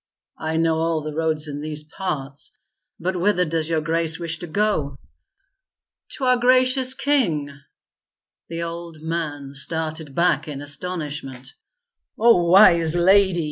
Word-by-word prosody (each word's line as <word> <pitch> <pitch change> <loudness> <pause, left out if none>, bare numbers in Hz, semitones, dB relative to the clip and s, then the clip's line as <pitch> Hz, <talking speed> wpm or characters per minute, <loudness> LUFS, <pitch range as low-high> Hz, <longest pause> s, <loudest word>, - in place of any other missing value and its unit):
"I 160 0 -2
know 165 -1 +1
all 165 -1 0
the 155 0 -5
roads 160 -1 0
in 145 0 -6
these 150 0 -5
parts. 150 -4 -5 0.4
But 185 +2 -2
whither 180 0 +2
does 160 0 -2
your 160 -1 +1
grace 165 0 -1
wish 165 -2 -3
to 175 - -7
go?" 155 -7 -1 1.2
"To 275 - -6
our 255 -1 +4
gracious 255 +1 +4
king." 175 - +1 1.0
The 165 0 -4
old 170 -2 -7
man 150 -4 -4
started 155 0 -4
back 170 -3 +2
in 145 -2 -6
astonishment. 145 -4 -6 0.6
"O 220 -7 +4
Wise 170 -3 +6
Lady!" 190 +1 +4
165 Hz, 135 wpm, -22 LUFS, 150-180 Hz, 1.2 s, Wise